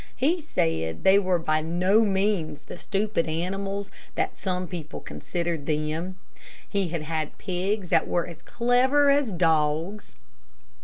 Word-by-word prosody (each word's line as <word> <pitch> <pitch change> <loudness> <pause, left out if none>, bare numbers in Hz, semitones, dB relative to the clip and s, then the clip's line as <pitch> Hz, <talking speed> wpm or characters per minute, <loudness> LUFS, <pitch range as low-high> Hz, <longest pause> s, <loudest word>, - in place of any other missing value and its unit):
He 325 +7 +1
said 80 - -1
they 195 +1 +7
were 185 -2 +2
by 155 -1 +1
no 180 +6 +3
means 190 -7 0
the - - -8
stupid 205 -4 0
animals 195 +5 -2 0.2
that - - -1
some 185 -1 -2
people 165 -1 -6
considered 170 -4 -4
them. 155 +4 -1 0.5
He 200 -2 0
had 165 -2 -3
had 155 -1 -3
pigs 190 +1 -2
that - - +3
were 175 - +1
as 170 -2 -10
clever 260 +7 +3
as 280 -5 +2
dogs. 165 - 0
180 Hz, 140 wpm, -26 LUFS, 160-200 Hz, 0.5 s, they